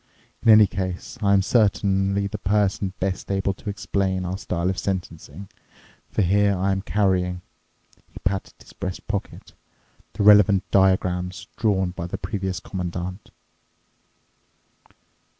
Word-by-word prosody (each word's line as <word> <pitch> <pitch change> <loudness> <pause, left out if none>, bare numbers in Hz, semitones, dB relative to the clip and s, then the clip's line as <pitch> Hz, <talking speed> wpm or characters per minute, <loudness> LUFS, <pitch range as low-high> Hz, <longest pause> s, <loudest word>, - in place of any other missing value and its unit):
In 115 - +2
any 105 -1 +8
case, 95 +4 -5
I 100 -1 +2
am 100 -1 +4
certainly 100 -2 +2
the 100 +1 -5
person 100 -1 0
best 95 0 -3
able 95 0 0
to 105 - -8
explain 95 -2 -1
our 90 +1 -3
style 90 -4 -3
of 95 - -4
sentencing, 95 -1 -5 0.6
for 105 - 0
here 100 +2 +2
I 95 +2 +1
am 95 0 -1
carrying"—he 90 -3 -3
patted 95 0 -2
his - - -16
breast 90 0 -6
pocket—"the - - -7
relevant 105 -2 +6
diagrams 95 0 +1
drawn 95 -5 +1
by 85 -1 -6
the 95 - -4
previous 95 -3 -3
Commandant." 90 +1 -5
95 Hz, 125 wpm, -23 LUFS, 90-100 Hz, 0.6 s, any